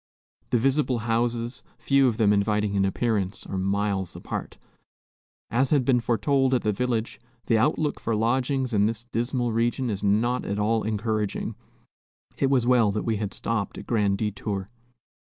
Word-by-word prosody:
The -, -, +3 dB
visible 135 Hz, +1 st, +1 dB
houses, 120 Hz, +1 st, -1 dB, 0.2 s
few 135 Hz, -1 st, +3 dB
of 115 Hz, -3 st, 0 dB
them 105 Hz, -3 st, +4 dB
inviting 105 Hz, 0 st, +1 dB
in 100 Hz, -1 st, +2 dB
appearance, 100 Hz, -1 st, -1 dB
are -, -, -5 dB
miles 95 Hz, -1 st, -1 dB
apart. -, -, -6 dB, 0.9 s
As 130 Hz, +3 st, +2 dB
had 140 Hz, -5 st, +2 dB
been 125 Hz, -2 st, +4 dB
foretold 130 Hz, +4 st, +2 dB
at 125 Hz, -, 0 dB
the 105 Hz, -, +2 dB
village, 120 Hz, +1 st, -2 dB, 0.3 s
the 115 Hz, -, +3 dB
outlook 150 Hz, +4 st, +1 dB
for 115 Hz, -, -1 dB
lodgings 130 Hz, +3 st, 0 dB
in 105 Hz, 0 st, +3 dB
this 115 Hz, 0 st, -4 dB
dismal 120 Hz, +1 st, -1 dB
region 120 Hz, +2 st, 0 dB
is 100 Hz, -, -4 dB
not 110 Hz, +5 st, +1 dB
at 100 Hz, -, -3 dB
all 110 Hz, +2 st, +1 dB
encouraging. 110 Hz, -1 st, -2 dB, 0.8 s
It 135 Hz, -, +1 dB
was 130 Hz, -4 st, +2 dB
well 120 Hz, -4 st, +4 dB
that 105 Hz, +1 st, -2 dB
we 110 Hz, -2 st, 0 dB
had 100 Hz, -1 st, -3 dB
stopped 110 Hz, -3 st, -3 dB
at -, -, -8 dB
Grand 105 Hz, -4 st, +1 dB
Detour. 100 Hz, -1 st, -3 dB
115 Hz, 165 wpm, -25 LUFS, 105-125 Hz, 0.9 s, them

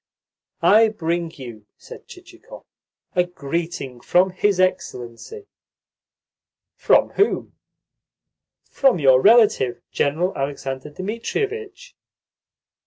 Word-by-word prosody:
"I 220 Hz, +2 st, +6 dB
bring 170 Hz, -5 st, -3 dB
you," 115 Hz, -6 st, -11 dB
said -, -, -13 dB
Chichikov, -, -, -14 dB, 0.5 s
"a 180 Hz, -, +4 dB
greeting 160 Hz, -5 st, -5 dB
from 185 Hz, +6 st, +2 dB
his 190 Hz, +1 st, 0 dB
Excellency." 185 Hz, -, -3 dB, 1.3 s
"From -, -, +3 dB
whom?" 405 Hz, -, -1 dB, 1.1 s
"From 270 Hz, -7 st, +2 dB
your 135 Hz, -4 st, +4 dB
relative 205 Hz, -, +4 dB
General 165 Hz, +6 st, -1 dB
Alexander 135 Hz, 0 st, -5 dB
Dmitrievitch." 400 Hz, -, -5 dB
175 Hz, 85 wpm, -21 LUFS, 135-215 Hz, 1.3 s, I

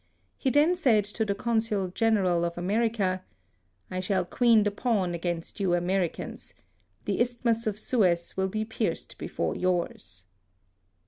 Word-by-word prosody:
He 265 Hz, -, 0 dB
then 295 Hz, +6 st, +4 dB
said 245 Hz, -, +3 dB
to 210 Hz, +2 st, -2 dB
the 200 Hz, -1 st, -1 dB
Consul 220 Hz, -3 st, 0 dB
General 185 Hz, -4 st, +2 dB
of 170 Hz, 0 st, -2 dB
Ame 175 Hz, +1 st, -3 dB
rica 200 Hz, -6 st, 0 dB, 0.2 s
— 90 Hz, -, -43 dB
" 90 Hz, -, -36 dB
I 185 Hz, -, -2 dB
shall 185 Hz, -1 st, 0 dB
queen 230 Hz, +2 st, +4 dB
the 205 Hz, -, +1 dB
pawn 200 Hz, -5 st, 0 dB
against 170 Hz, +2 st, -4 dB
you 185 Hz, -3 st, +2 dB
Americans. 175 Hz, 0 st, -2 dB, 0.5 s
The -, -, 0 dB
Isthmus 235 Hz, -1 st, 0 dB
of 210 Hz, -1 st, -1 dB
Suez 185 Hz, -7 st, +1 dB
will 190 Hz, 0 st, +1 dB
be 215 Hz, +3 st, -2 dB
pierced 220 Hz, -, -3 dB
before -, -, -2 dB
yours." 170 Hz, -, -2 dB
200 Hz, 155 wpm, -27 LUFS, 180-225 Hz, 0.5 s, then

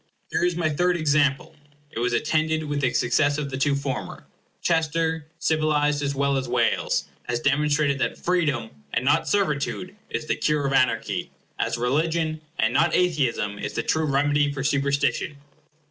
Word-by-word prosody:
Here -, -, 0 dB
is 175 Hz, -1 st, +2 dB
my 170 Hz, -2 st, 0 dB
third 175 Hz, +4 st, +1 dB
example. 145 Hz, -1 st, +1 dB, 0.4 s
It -, -, -5 dB
was 125 Hz, +1 st, +1 dB
attended 155 Hz, +2 st, +1 dB
with 145 Hz, -1 st, -2 dB
the 130 Hz, -3 st, +2 dB
success 145 Hz, +5 st, +2 dB
of 145 Hz, -2 st, -3 dB
the 130 Hz, -, -3 dB
two 140 Hz, +1 st, +2 dB
former. 140 Hz, -2 st, -4 dB, 0.4 s
Chester, 160 Hz, -1 st, 0 dB
civilized 150 Hz, -2 st, +1 dB
as 140 Hz, -1 st, -1 dB
well 140 Hz, 0 st, +1 dB
as 130 Hz, -2 st, -3 dB
Wales, 120 Hz, -2 st, +1 dB, 0.3 s
has 120 Hz, -1 st, 0 dB
demonstrated 145 Hz, +1 st, +1 dB
that -, -, -1 dB
freedom, 145 Hz, -11 st, 0 dB, 0.2 s
and 120 Hz, -, 0 dB
not 145 Hz, +3 st, +3 dB
servitude, 185 Hz, +1 st, -1 dB
is -, -, -3 dB
the -, -, 0 dB
cure 150 Hz, -2 st, 0 dB
of 135 Hz, -, 0 dB
anarchy; 130 Hz, -2 st, +1 dB, 0.3 s
as -, -, 0 dB
religion, 155 Hz, +5 st, 0 dB, 0.2 s
and 110 Hz, +2 st, +1 dB
not 160 Hz, +4 st, +3 dB
atheism, 135 Hz, -, 0 dB
is -, -, -4 dB
the -, -, -1 dB
true 160 Hz, 0 st, +1 dB
remedy 145 Hz, 0 st, +2 dB
for 135 Hz, -1 st, -4 dB
superstition. 140 Hz, 0 st, 0 dB
145 Hz, 165 wpm, -24 LUFS, 135-155 Hz, 0.4 s, not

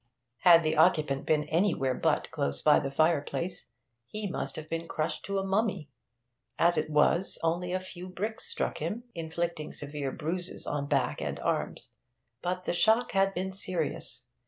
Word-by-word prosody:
Had 170 Hz, -2 st, +7 dB
the 155 Hz, 0 st, +1 dB
occupant 155 Hz, -5 st, +3 dB
been 150 Hz, -1 st, +3 dB
anywhere 155 Hz, -4 st, +1 dB
but -, -, 0 dB
close 70 Hz, 0 st, -2 dB
by 150 Hz, -, +6 dB
the 135 Hz, -, -3 dB
fireplace, 160 Hz, +3 st, 0 dB, 0.4 s
he 210 Hz, -, -4 dB
must 180 Hz, -, -4 dB
have 155 Hz, 0 st, -7 dB
been 165 Hz, +1 st, -3 dB
crushed 155 Hz, -1 st, -2 dB
to 200 Hz, 0 st, -2 dB
a 195 Hz, -, -1 dB
mummy; 195 Hz, -5 st, 0 dB, 0.7 s
as 170 Hz, +1 st, +4 dB
it -, -, -1 dB
was, 155 Hz, +5 st, +3 dB
only 175 Hz, +2 st, 0 dB
a 185 Hz, -, 0 dB
few 185 Hz, 0 st, -8 dB
bricks 215 Hz, -, -4 dB
struck 465 Hz, 0 st, -2 dB
him, 235 Hz, +3 st, -3 dB
inflicting 165 Hz, -1 st, -3 dB
severe 145 Hz, -2 st, -4 dB
bruises 175 Hz, +5 st, -4 dB
on 145 Hz, -1 st, -2 dB
back -, -, 0 dB
and -, -, -3 dB
arms. -, -, -2 dB, 0.5 s
But 180 Hz, +1 st, -2 dB
the -, -, -1 dB
shock 220 Hz, +7 st, +3 dB
had 195 Hz, 0 st, +2 dB
been 190 Hz, +2 st, -2 dB
serious. 160 Hz, -10 st, -2 dB
170 Hz, 165 wpm, -29 LUFS, 150-185 Hz, 0.7 s, Had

